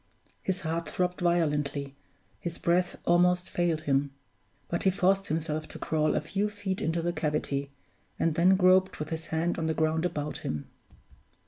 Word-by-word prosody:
His 190 0 -2
heart 165 0 -2
throbbed 180 0 -1
violently, 150 -5 +1 0.5
his 170 -1 -4
breath 175 +1 +1
almost 180 +1 +3
failed 170 -3 +1
him; 140 -1 +1 0.6
but 170 - -2
he 190 - +4
forced 195 +1 +2
himself 155 -1 -2
to - - -9
crawl 155 -1 +1
a - - +1
few 195 +7 -1
feet 205 -2 -4
into 165 +1 0
the 175 0 0
cavity, 150 -3 -1 0.5
and 165 - +1
then 180 +4 +5
groped 185 0 +4
with 150 0 -5
his 160 0 -5
hand 165 +2 0
on 160 - -1
the 160 - 0
ground 160 +1 +1
about 150 -4 -2
him. 75 -1 -4
165 Hz, 165 wpm, -29 LUFS, 155-180 Hz, 0.6 s, then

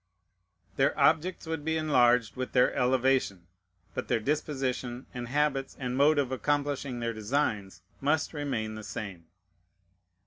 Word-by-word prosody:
Their 135 +1 +2
objects 165 +4 +2
would 160 -2 -3
be 160 +1 0
enlarged 125 -7 +3
with 130 0 -4
their 125 -1 +4
elevation; 125 -7 +1 0.5
but - - -4
their - - +1
disposition, 130 -2 -2
and 125 -1 -5
habits, 140 0 0
and 125 -2 -2
mode 145 +3 +4
of 135 -3 +1
accomplishing 140 -1 -1
their 115 0 -2
designs 110 -3 -2 0.2
must 150 +4 +1
remain 135 -8 -2
the 110 0 -8
same. 100 -5 -7
130 Hz, 135 wpm, -29 LUFS, 120-145 Hz, 0.5 s, their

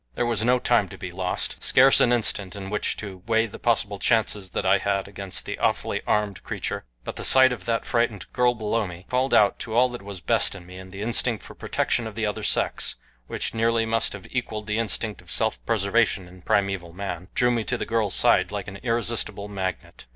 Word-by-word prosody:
There - - 0
was 115 -3 0
no 125 +2 +4
time 120 -5 +2
to - - -10
be 90 - -6
lost, 90 0 -2
scarce 135 +1 +6
an 120 - +4
instant 105 -5 0
in 95 -1 -7
which 105 - -1
to 95 -4 -7
weigh 115 0 +3
the 110 - -10
possible 105 -4 +1
chances 105 -4 +1
that 95 - -3
I 95 +1 +5
had 100 0 -1
against 100 -1 -3
the - - -5
awfully - - 0
armed 105 -3 0
creature; - - -4 0.2
but - - -6
the - - -4
sight 130 -1 +6
of 125 - -8
that 115 -1 0
frightened 115 -4 0
girl 125 -1 +3
below 110 -1 -1
me 90 +1 -10
called 130 +2 +1
out 105 -1 +4
to 110 -1 -5
all 125 +2 +5
that 120 0 -7
was 100 -1 -8
best 85 - +1
in 90 -3 -10
me, 90 +1 -10
and 95 0 -11
the 100 +1 -6
instinct 115 -1 0
for - - -10
protection 115 - -1
of 110 - -9
the 110 -1 -1
other 105 - -2
sex, - - 0 0.3
which - - -3
nearly 115 0 +2
must 115 0 0
have 100 -2 -9
equaled 110 -4 -3
the 105 +1 -1
instinct 110 -2 -2
of - - -19
self 60 -1 0
preservation 100 -2 +2
in 90 +1 -15
primeval 95 -3 0
man, 95 -1 -5
drew 125 0 +3
me 115 -2 0
to 125 - -1
the - - -3
girl's 110 -4 +1
side 95 0 +4
like 100 0 -4
an 100 0 -7
irresistible 115 -3 -2
magnet. 95 -9 -5
105 Hz, 225 wpm, -25 LUFS, 95-115 Hz, 0.3 s, scarce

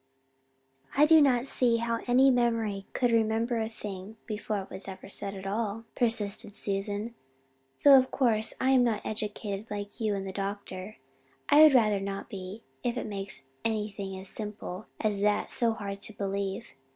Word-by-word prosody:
"I 295 - +7
do 320 0 +7
not 255 -3 +3
see 245 -3 +3
how 230 0 -1
any 260 +2 +5
memory 230 -5 0
could 245 -2 +1
remember 225 +1 +1
a 220 - -2
thing 205 -1 -8
before 210 -1 -3
it - - -15
was 190 +1 -6
ever 190 0 -9
said 200 0 -1
at 190 0 -8
all," 215 +2 -2
persisted 210 -3 +1
Susan, 205 +3 -3 0.7
"though 275 -2 +9
of 260 - -1
course 220 -4 +2
I 260 - +2
am 260 -2 +5
not 230 -3 0
educated 210 -1 -4
like 205 +2 -6
you 215 -2 +1
and 195 -1 -4
the - - -4
doctor. 195 0 -5 0.5
I 295 +1 +7
would 310 -3 +8
rather 215 -4 +4
not 195 0 -5
be, 195 +3 -7 0.2
if 245 0 -1
it - - -3
makes 195 -9 -5 0.2
anything 210 -3 -3
as 190 +1 -5
simple 210 -2 -5
as 210 -3 0
that 210 0 +1
so 230 -2 +1
hard 200 -2 -6
to 215 - -2
believe. 200 +2 -3
215 Hz, 175 wpm, -29 LUFS, 200-235 Hz, 0.7 s, though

